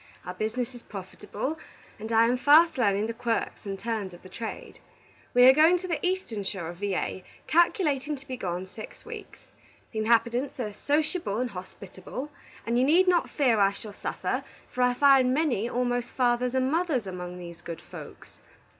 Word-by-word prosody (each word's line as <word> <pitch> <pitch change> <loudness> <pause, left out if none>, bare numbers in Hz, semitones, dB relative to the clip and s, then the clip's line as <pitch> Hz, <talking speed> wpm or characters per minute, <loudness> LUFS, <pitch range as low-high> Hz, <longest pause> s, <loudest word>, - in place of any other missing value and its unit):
Our 180 - -5
business 225 +6 -2
is 245 - -11
profitable, 210 - -6 0.4
and 220 +2 -6
I 225 0 +5
am 240 +2 +2
fast 310 +6 +6
learning 205 -2 +2
the 230 - -3
Quirks 230 -2 -2
and 195 0 -3
Turns 210 -4 -3
of 180 - -14
trade. 225 +3 -7 0.6
We 245 - +7
are 260 - +10
going 320 +5 +6
to 370 +1 -6
the 335 -3 -2
eastern 360 - -1
shore 190 -4 -4
of 175 - -8
Va., 195 -1 -2 0.2
calculating 305 -4 +2
to 275 -1 -14
be 255 - -4
gone 180 -5 -3
six 215 +3 -11
weeks. - - -9 0.5
The 220 - -3
inhabitants 235 +5 +1
are 215 -4 -3
sociable 295 - -1
and 245 0 -1
hospitable, 190 +8 -8 0.3
and 235 +1 +1
you - - +4
need 340 +7 +4
not 355 -2 +3
fear 250 -7 +2
I 200 0 +4
shall 210 +1 -9
suffer, - - -3 0.3
for 250 - -2
I 250 0 +3
find 265 -2 +5
many 255 -8 +1
almost 245 -1 0
fathers 250 0 +1
and 260 +1 +1
mothers 320 - +1
among 180 -1 -6
these 170 -1 -9
good 170 -1 -7
folks. - - -12
240 Hz, 180 wpm, -27 LUFS, 200-280 Hz, 0.6 s, are